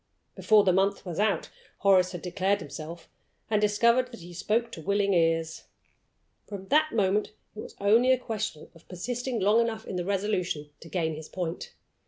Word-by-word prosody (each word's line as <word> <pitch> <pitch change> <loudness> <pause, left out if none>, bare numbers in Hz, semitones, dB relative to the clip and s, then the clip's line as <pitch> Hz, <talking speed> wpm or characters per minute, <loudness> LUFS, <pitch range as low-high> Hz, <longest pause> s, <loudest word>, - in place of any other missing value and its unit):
Before 215 -2 +4
the 185 - +3
month 195 +2 +1
was 175 -1 -5
out 210 -1 0 0.3
Horace 185 -2 +4
had 175 -2 -7
declared 190 +2 0
himself, 165 +1 -8 0.4
and 210 -1 +2
had 210 - +4
discovered 235 +5 +3
that 235 -7 -11
he 175 +1 -11
spoke 230 +6 -1
to 165 - -8
willing 200 +3 +1
ears. 165 -1 +1 0.8
From 195 -2 -8
that 310 +1 +3
moment 210 0 +1 0.2
it - - -9
was - - -9
only 225 +6 +4
a 260 - +5
question 215 -9 -5
of 165 - -20
persisting 245 +6 -3
long 210 +4 +4
enough 225 -1 -2
in 185 - -5
the 175 - -1
resolution 185 -6 -2
to 165 - -12
gain 160 -3 -1
his 155 0 -9
point. 175 -2 -5
200 Hz, 185 wpm, -27 LUFS, 175-215 Hz, 0.8 s, a